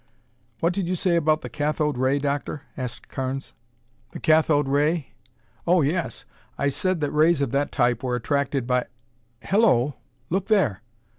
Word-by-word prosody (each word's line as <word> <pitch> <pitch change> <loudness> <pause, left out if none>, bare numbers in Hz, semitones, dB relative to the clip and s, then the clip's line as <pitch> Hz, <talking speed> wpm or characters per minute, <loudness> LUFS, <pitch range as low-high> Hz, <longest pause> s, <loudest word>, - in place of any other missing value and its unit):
"What 170 +2 +2
did 190 -2 -2
you 185 - 0
say 180 0 +1
about 155 -1 +2
the - - -6
cathode 150 0 -1
ray, 130 +3 +2
Doctor?" 145 0 -2
asked 125 -3 -6
Carnes. 135 +1 -4 0.6
"The - - -6
cathode 155 -3 +3
ray? 145 +2 +1 0.6
Oh, 175 -2 +4
yes. 165 +4 -2 0.3
I 140 - +1
said 185 +4 -1
that 145 - 0
rays 155 +1 +4
of 140 - 0
that 140 +1 0
type 120 -1 +1
were 125 -2 -1
attracted 140 +1 -1
by 125 0 0 0.6
Hello, 175 - +3 0.3
look 190 +2 0
there!" 185 - +2
145 Hz, 155 wpm, -24 LUFS, 135-170 Hz, 0.6 s, Oh